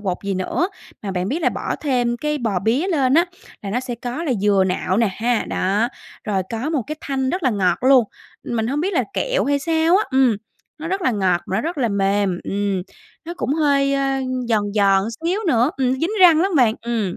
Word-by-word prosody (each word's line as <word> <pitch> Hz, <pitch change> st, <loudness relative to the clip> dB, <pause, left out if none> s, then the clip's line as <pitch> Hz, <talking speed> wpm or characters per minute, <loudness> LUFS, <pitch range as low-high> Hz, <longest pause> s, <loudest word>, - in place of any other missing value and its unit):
bột 185 Hz, -3 st, -2 dB
gì 200 Hz, -, -1 dB
nữa. 190 Hz, -, -1 dB, 0.3 s
Mà 200 Hz, -, -4 dB
bạn 185 Hz, 0 st, -2 dB
biết 320 Hz, +8 st, -2 dB
là -, -, +4 dB
bỏ -, -, -3 dB
thêm 245 Hz, -5 st, 0 dB
cái 300 Hz, +3 st, -2 dB
bò 220 Hz, -7 st, -1 dB
bía 235 Hz, -, 0 dB
lên 275 Hz, -7 st, +2 dB
á, 335 Hz, +3 st, +5 dB, 0.4 s
là 200 Hz, -, -5 dB
nó 245 Hz, +5 st, 0 dB
sẽ 255 Hz, -2 st, -5 dB
có 245 Hz, +6 st, -5 dB
là 275 Hz, -, 0 dB
dừa 200 Hz, -2 st, +3 dB
nạo 185 Hz, 0 st, -1 dB
nè 230 Hz, 0 st, +3 dB
ha, 235 Hz, +3 st, 0 dB
đó, 205 Hz, +5 st, 0 dB, 0.4 s
rồi 195 Hz, -3 st, 0 dB
có 235 Hz, +7 st, -3 dB
một 295 Hz, -6 st, 0 dB
cái 305 Hz, -, -5 dB
thanh 265 Hz, -1 st, -2 dB
rất 365 Hz, -, -2 dB
là 260 Hz, -, +3 dB
ngọt 185 Hz, -5 st, +1 dB
luôn, 260 Hz, -2 st, +6 dB, 0.4 s
mình 225 Hz, -2 st, -2 dB
hông 280 Hz, +5 st, -1 dB
biết 385 Hz, +4 st, -1 dB
là -, -, +1 dB
kẹo -, -, 0 dB
hay 285 Hz, 0 st, +1 dB
sao 325 Hz, +3 st, +2 dB
á. 415 Hz, -, +2 dB
Ừm, 260 Hz, -5 st, +3 dB, 0.4 s
nó 320 Hz, +2 st, -5 dB
rất 385 Hz, +2 st, -2 dB
là 260 Hz, -, +2 dB
ngọt, 190 Hz, -5 st, +1 dB
mà 190 Hz, -, -2 dB
nó -, -, +1 dB
rất 325 Hz, +4 st, -4 dB
là 245 Hz, -3 st, +1 dB
mềm, 200 Hz, -2 st, +1 dB
ừm, 200 Hz, -2 st, -1 dB, 0.4 s
nó 345 Hz, -, -6 dB
cũng 285 Hz, -, -1 dB
hơi, 280 Hz, -3 st, +2 dB
ơ, 275 Hz, -1 st, 0 dB, 0.3 s
giòn 215 Hz, -3 st, +2 dB
giòn 195 Hz, -2 st, +3 dB, 0.2 s
xíu 370 Hz, +5 st, 0 dB
nữa, 250 Hz, -3 st, +3 dB
ừm, 255 Hz, -2 st, +1 dB
dính 325 Hz, +8 st, -1 dB
răng 335 Hz, -4 st, +7 dB
lắm 380 Hz, +1 st, +1 dB
bạn, 230 Hz, -4 st, +4 dB
ừm. 225 Hz, -6 st, -2 dB
245 Hz, 230 wpm, -21 LUFS, 205-300 Hz, 0.4 s, răng